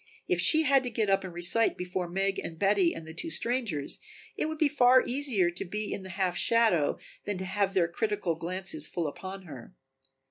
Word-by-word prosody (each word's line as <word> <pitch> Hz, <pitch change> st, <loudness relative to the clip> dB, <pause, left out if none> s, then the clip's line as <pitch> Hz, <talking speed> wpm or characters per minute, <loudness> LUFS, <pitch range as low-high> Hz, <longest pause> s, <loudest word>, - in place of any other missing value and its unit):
If 175 Hz, -1 st, +1 dB
she 315 Hz, -, +5 dB
had 275 Hz, -2 st, +4 dB
to -, -, -2 dB
get 220 Hz, -3 st, 0 dB
up 195 Hz, -, +2 dB
and 185 Hz, -, -6 dB
recite 175 Hz, +7 st, +2 dB
before 180 Hz, 0 st, -3 dB
Meg 195 Hz, +2 st, -1 dB
and 165 Hz, -, -7 dB
Betty 195 Hz, -2 st, +3 dB
and 165 Hz, -, -8 dB
the 160 Hz, -, -9 dB
two 330 Hz, -, -4 dB
strangers 230 Hz, -, -1 dB, 0.4 s
it -, -, -1 dB
would 315 Hz, 0 st, -4 dB
be 305 Hz, -, +3 dB
far 255 Hz, -3 st, +5 dB
easier 240 Hz, -10 st, +1 dB
to 175 Hz, -, -6 dB
be 210 Hz, +3 st, -4 dB
in -, -, -5 dB
the 190 Hz, -, -9 dB
half 185 Hz, -1 st, -1 dB
shadow 220 Hz, -7 st, +2 dB, 0.3 s
than 205 Hz, -2 st, -3 dB
to 190 Hz, -, -5 dB
have 195 Hz, +1 st, -1 dB
their 175 Hz, -3 st, +3 dB
critical 195 Hz, -1 st, -1 dB
glances 185 Hz, -, -2 dB
full 170 Hz, -, -3 dB
upon 190 Hz, +6 st, -6 dB
her. 150 Hz, +1 st, -11 dB
195 Hz, 210 wpm, -29 LUFS, 175-230 Hz, 0.4 s, she